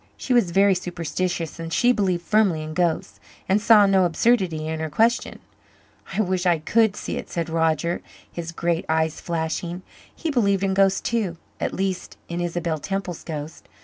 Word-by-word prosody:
She 260 - -1
was 235 -7 +4
very 195 +3 +4
superstitious 175 -1 -3
and 165 0 -5
she 245 +8 +4
believed 185 -7 0
firmly 200 -8 +2
in 155 0 -6
ghosts, 170 -1 -1 0.3
and 195 +2 +2
saw 215 -2 +7
no 195 -1 +4
absurdity 175 -3 +1
in 160 0 -3
her 160 0 -3
question. 230 +9 +1 0.8
"I - - +1
wish 185 -2 0
I 175 -2 +4
could 215 +6 +2
see - - -4
it," - - -6
said 170 -1 -3
Roger, 165 +1 +1 0.3
his 170 -1 -5
great 170 0 -1
eyes 160 0 0
flashing. 170 +2 -3 0.3
He 325 - -2
believed 200 -7 +2
in 195 -1 +1
ghosts 195 0 +3
too, 210 -8 -1 0.2
at - - -2
least 190 -1 -3
in 170 +1 -3
Isabel 170 -2 -2
Temple's 190 0 -4
ghost. 155 -1 -7
175 Hz, 175 wpm, -23 LUFS, 165-195 Hz, 0.8 s, saw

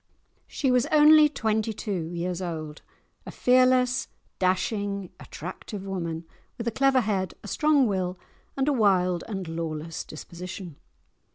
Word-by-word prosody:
She 270 -3 0
was 250 -1 +3
only 305 0 +7
twenty 220 -4 -1
two 200 -4 -3
years 175 +1 -3
old—a 160 -4 -8
fearless, 255 0 +3 0.3
dashing, 200 +1 -1
attractive 190 +4 -8
woman, 170 -4 -4 0.3
with 235 -1 -5
a - - +1
clever 265 +2 +3
head, 195 -5 -1
a - - -8
strong 300 -3 +3
will, 185 -4 -1 0.4
and 270 +1 +1
a 295 - +3
wild 185 -7 +2
and 195 -5 -4
lawless 165 -1 -4
disposition. 175 +1 -8
195 Hz, 125 wpm, -26 LUFS, 175-250 Hz, 0.4 s, only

